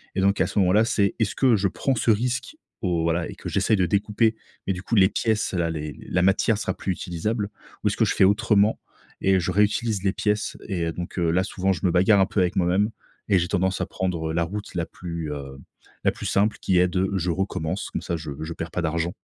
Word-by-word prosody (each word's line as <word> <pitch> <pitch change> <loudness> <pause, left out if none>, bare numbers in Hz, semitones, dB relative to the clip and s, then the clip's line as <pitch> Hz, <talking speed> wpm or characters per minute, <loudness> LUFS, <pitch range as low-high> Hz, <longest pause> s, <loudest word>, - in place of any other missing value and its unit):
Et 95 - +1
donc, 100 +1 +2
heu, - - +6
à - - -3
ce - - -7
moment-là, 100 +4 +4
c'est, 100 -4 +1
est-ce 110 -3 0
que 130 -4 +4
je 100 0 +1
prends 135 +8 -1
ce 115 0 0
risque 125 - -1 0.3
au 85 -4 0
voilà 85 +1 0
et - - -8
que - - -8
j'essaie 110 - +2
de 90 - +2
découper. 105 +4 +1 0.3
Mais, 95 - +2
du 90 - -7
coup, 115 - -1
les 95 -3 +6
pièces-là, 105 -7 0
les 75 -2 -5
la 90 - +1
matière 100 +3 +3
sera - - -2
plus 95 - -3
utilisable, 100 +6 -3 0.3
ou - - +2
est-ce - - +1
que - - +3
je - - 0
fais - - +4
autrement 105 +1 +3 0.4
et 95 -1 +3
je 90 +1 -1
réutilise 105 +1 +1
les 95 - +2
pièces 105 -1 -1
et 85 -5 -1
donc 90 +2 -7
heu, 85 -1 +2
là, 90 +2 +2
souvent, 95 -2 -1
je 85 - -4
me 90 - +3
bagarre 95 +4 +4
un - - +5
peu 105 -1 0
avec 90 +3 0
moi-même 95 +4 +2 0.4
et 95 - +5
j'ai 85 - 0
tendance 95 0 0
à - - +1
prendre, 85 -4 -2
heu, - - -4
la 85 +1 +1
route 100 +4 -6
la 85 -2 0
plus, 85 -4 -6
heu, 70 -1 -8 0.5
la - - +5
plus - - -8
simple, 105 +2 +2
qui 95 - +2
est 90 - +4
de, 95 +1 0
je 90 0 0
recommence, 95 0 -2
comme - - -3
ça 85 - -2
je 75 -2 -7
je 80 - -5
perds 80 +1 -6
pas 90 - -2
d'argent. 85 +2 -1
95 Hz, 250 wpm, -24 LUFS, 85-105 Hz, 0.5 s, heu